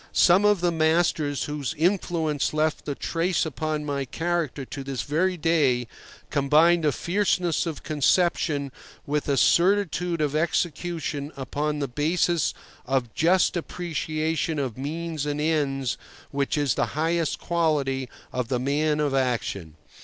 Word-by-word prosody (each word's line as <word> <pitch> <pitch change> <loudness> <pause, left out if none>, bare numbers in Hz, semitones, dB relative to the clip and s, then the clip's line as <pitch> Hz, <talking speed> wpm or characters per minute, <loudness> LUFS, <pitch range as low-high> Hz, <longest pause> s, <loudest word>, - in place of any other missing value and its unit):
Some 185 +4 +5
of 210 -3 +4
the 175 -1 +2
masters 160 -2 +1
whose 150 +1 -3
influence 160 -4 0
left 155 0 0
a 140 - -2
trace 170 +4 0
upon 155 0 -3
my 140 -1 -1
character 160 -1 -2
to 135 +2 -7
this 135 -4 -3
very 180 +5 0
day, 150 -7 +2 0.5
combined 155 +4 +4
a 150 - +4
fierceness 180 -1 0
of 155 -4 -5
conception 150 -1 +1 0.3
with 150 +1 -1
a 140 - +2
certitude 180 +2 +2
of 150 -1 0
execution 160 -2 -1
upon 150 +3 -2
the 140 -1 -2
basis 160 +4 +1 0.3
of 125 -3 -1
just 175 +4 +3
appreciation 160 -2 -2
of 130 -6 -2
means 155 +2 -4
and 145 0 -2
ends 140 -4 0 0.3
which 140 +1 -1
is 145 -5 +2
the - - +1
highest 165 0 +1
quality 145 -6 0 0.2
of 125 -2 -2
the 125 0 -1
man 150 +3 +1
of 145 -2 0
action. 115 - -1
155 Hz, 140 wpm, -25 LUFS, 140-170 Hz, 0.5 s, Some